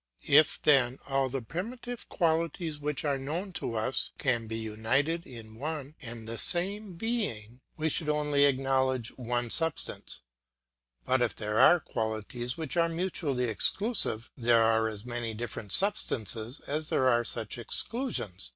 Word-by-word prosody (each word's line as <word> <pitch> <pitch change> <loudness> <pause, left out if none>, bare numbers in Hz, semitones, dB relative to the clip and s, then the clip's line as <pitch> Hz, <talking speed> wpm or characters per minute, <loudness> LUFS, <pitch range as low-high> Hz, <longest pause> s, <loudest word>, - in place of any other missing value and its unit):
If 150 +2 +5
then 130 -3 +4
all 135 -1 0
the 130 -1 -4
primitive 235 - -6
qualities 165 -2 0
which 150 0 -2
are 140 -2 0
known 170 +8 -4
to 115 - -3
us 110 +4 -1
can 120 -5 0
be 110 0 -3
united 115 +10 0
in 115 -3 -9
one 150 -1 -4
and 115 -3 -6
the 115 0 -1
same 195 +3 +3
being, 165 - -3 0.2
we 160 0 0
should 155 0 +1
only 150 -1 +3
acknowledge 130 -3 +1
one 120 -1 -2
substance; 165 -1 +1 0.8
but 130 0 +2
if 120 - +1
there 105 0 -1
are 175 - +7
qualities 115 +1 -3
which 160 +1 -4
are 170 0 +3
mutually 165 -6 -2
exclusive, 120 - +1
there 115 -3 +3
are 110 0 +3
as 105 0 -6
many 120 -2 -4
different 105 -3 -6
substances 120 - +1
as 155 +2 -3
there 130 - +2
are 120 -2 +3
such 115 +1 -3
exclusions. 115 - -3
130 Hz, 150 wpm, -29 LUFS, 115-160 Hz, 0.8 s, are